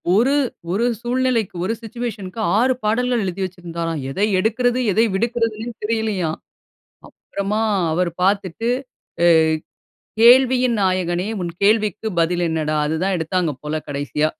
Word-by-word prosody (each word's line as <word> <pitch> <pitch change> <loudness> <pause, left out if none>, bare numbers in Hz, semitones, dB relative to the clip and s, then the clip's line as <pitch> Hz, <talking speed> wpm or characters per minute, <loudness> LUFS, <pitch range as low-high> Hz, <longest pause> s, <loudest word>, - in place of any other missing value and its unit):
ஒரு 240 +6 +3 0.4
1 220 +6 +1 0.2
சூழ்நிலைக்கு 245 -4 0
1 215 +5 0
சிட்யூவேஷன்‌ 230 -3 -5
க்கு - - -8 0.2
6 260 +2 +3
பாடல்கள் 240 +2 +1
எழுதி 185 +1 -4
வச்சிருந்தாராம். 170 -3 -5
எதை 200 +8 +1
எடுக்கிறது, 245 +4 +1
எதை 220 +4 +3
விடுக்குறதுன்னே 230 +1 -1
தெரியலையாம். 210 -7 -1 0.9
அப்புறமா 200 +2 -1 0.3
அவர் 175 +1 0
பார்த்துட்டு, 200 +3 0 0.5
அ - - +5 0.9
"கேள்வியின் 250 0 +6
நாயகனே, 185 0 0
உன் 170 -1 -4
கேள்விக்கு 215 0 +2
பதில் 175 +1 +1
என்னடா?" 155 -1 -1
அது 160 +1 -1
தான் 195 -1 +1
எடுத்தாங்க 165 -1 -1
போல 155 +1 -3
கடைசியா 145 +2 -1
200 Hz, 125 wpm, -20 LUFS, 175-230 Hz, 0.9 s, கேள்வியின்